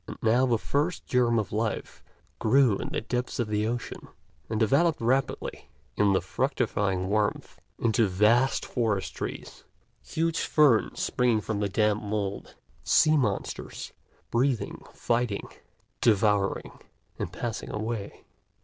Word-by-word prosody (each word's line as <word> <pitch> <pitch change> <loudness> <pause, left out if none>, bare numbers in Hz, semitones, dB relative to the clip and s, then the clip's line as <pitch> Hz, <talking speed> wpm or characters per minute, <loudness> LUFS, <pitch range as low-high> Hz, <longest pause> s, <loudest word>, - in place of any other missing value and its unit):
And - - -7
now 120 +4 +4
the 120 -2 +2
first 150 +9 -1
germ 120 -2 +2
of 110 -3 -1
life 110 +1 -3 0.4
grew 120 -1 +4
in - - -4
the - - -2
depths 125 +2 -3
of 120 -3 -1
the 105 0 0
ocean, 120 +1 -5 0.4
and 110 -1 -1
developed 140 +9 +3
rapidly 130 +3 -1 0.3
in 100 -1 +3
the 95 - +2
fructifying 100 - -1
warmth 105 +1 -1 0.2
into 115 -1 +2
vast 110 +8 +3
forest 110 -6 -1
trees, - - -6 0.4
huge 165 0 -1
ferns 145 -8 +3
springing 120 -3 +1
from 105 -1 -3
the 100 -1 0
damp 105 +1 +1
mould, 100 -1 -4 0.3
sea 155 0 +4
monsters 110 -9 -2 0.4
breeding, 125 0 0
fighting, 115 -4 -1 0.5
devouring, 105 -3 +1 0.4
and - - -3
passing 105 +6 -4
away. 110 -1 -4
110 Hz, 130 wpm, -27 LUFS, 105-125 Hz, 0.5 s, now